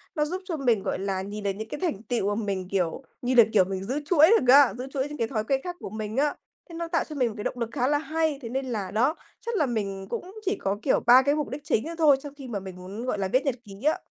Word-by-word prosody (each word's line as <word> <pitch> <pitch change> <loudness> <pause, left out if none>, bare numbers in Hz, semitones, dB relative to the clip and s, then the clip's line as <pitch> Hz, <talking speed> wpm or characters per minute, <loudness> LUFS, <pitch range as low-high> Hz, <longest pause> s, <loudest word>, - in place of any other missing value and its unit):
nó 300 -2 +2
giúp 365 +5 -4
cho 340 -4 -3
mình, 240 -8 +1
gọi - - -2
là, 195 -1 -2
nhìn 205 +2 -6
được 200 - +1
những 220 +3 -7
cái 295 - -5
thành 310 - -2
tựu 205 -4 0
mà 225 - -2
mình, 190 -2 -2
kiểu 185 +5 -1 0.2
như 255 +1 0
là, 235 - +9
kiểu, 200 -3 +6
mình 190 0 -4
giữ 260 +9 -2
chuỗi 320 -1 +6
được 255 0 +5
á, 275 -6 +7
giữ 255 +2 -5
chuỗi 270 0 -1
những 295 - -7
cái 230 - 0
thói 220 -3 -2
quen 265 +4 0
khác 355 -1 -5
của - - -6
mình 215 +2 -5
á. 290 +1 +2 0.3
Thế 335 - -9
nó 335 0 -3
tạo 335 0 +1
cho 305 - -9
mình 255 -4 +2
một - - -7
cái 205 - -5
động 245 - -3
lực 235 - -2
khá 255 -2 0
là 290 +1 +3
hay. 310 0 -1
Thế 230 - -6
nên 265 +3 -2
là, 210 -7 -3
đó, 250 +9 +2 0.3
chắc 470 - -2
là 310 - +3
mình 200 -5 -3
cũng 370 - -5
chỉ 390 - +1
có, 195 +1 -1
kiểu, 270 - +2
3 250 +2 +9
cái 285 +2 +2
mục 300 -1 -2
đích 280 +2 -6
chính 265 -4 0
đó 330 +1 -5
thôi 300 -4 +5
trong 290 -1 -8
khi 270 -3 -8
mà 215 -5 -3
mình 190 -1 -9
muốn, 190 +6 -7
gọi 230 -5 -1
là, 195 - 0
viết 255 +8 +1
nhật 275 - +1
ký 200 0 -12
á. 310 - +3
250 Hz, 315 wpm, -26 LUFS, 205-295 Hz, 0.3 s, là